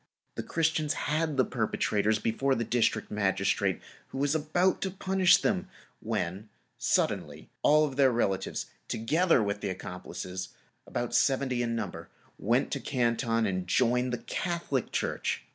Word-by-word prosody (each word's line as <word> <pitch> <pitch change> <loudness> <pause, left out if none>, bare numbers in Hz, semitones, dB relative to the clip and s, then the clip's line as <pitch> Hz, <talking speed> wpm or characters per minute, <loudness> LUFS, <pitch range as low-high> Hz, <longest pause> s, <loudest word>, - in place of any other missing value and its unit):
The - - -4
Christians 160 -2 0
had 155 -1 -1
the 130 - +4
perpetrators 110 -2 0
before 130 +6 0
the 115 - -1
District 115 -2 0
Magistrate, 100 -2 +1 0.3
who - - -8
was 140 +1 +1
about 160 +4 +1
to 190 - 0
punish 190 -1 +4
them; 190 -2 -1 0.3
when 105 -1 -3 0.3
suddenly - - 0
all 155 +1 +5
their 135 -1 +3
relatives, 95 -5 -1 0.2
together 155 +3 +2
with 100 0 -2
the - - -2
accomplices, 90 0 -6 0.3
about 120 -1 -3
seventy 130 0 +2
in 115 -1 -1
number, 100 -7 -5 0.3
went - - +1
to - - -1
Canton 115 -2 0
and 95 -2 -2
joined 125 +5 +2
the 120 - -1
Catholic 170 -8 -2
Church. - - -1
120 Hz, 140 wpm, -29 LUFS, 105-150 Hz, 0.3 s, all